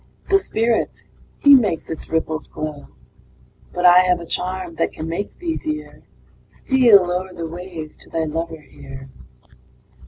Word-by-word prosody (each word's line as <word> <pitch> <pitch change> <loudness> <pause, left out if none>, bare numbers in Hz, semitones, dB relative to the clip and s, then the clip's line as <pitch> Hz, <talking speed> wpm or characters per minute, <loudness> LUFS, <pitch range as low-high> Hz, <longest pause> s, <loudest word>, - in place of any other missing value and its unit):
The 390 - +6
Spirit 230 - -1 0.3
he 285 - +7
makes 210 - +3
its 160 - -7
ripples 160 -1 -2
glow 150 -2 -6 0.8
But 180 0 -1
I 180 0 +9
have 180 -1 +3
a 170 - -8
charm 180 0 -3
that - - 0
can 155 - -6
make 170 +5 -4
thee, 335 -2 -3
dear, 305 -1 -5 0.5
Steal 245 -7 +5
o'er 180 +1 -3
the 165 - -4
wave 165 -2 -8
to - - -13
thy 165 - -1
lover 160 +1 -4
here. 135 -2 -12
175 Hz, 150 wpm, -21 LUFS, 160-205 Hz, 0.8 s, I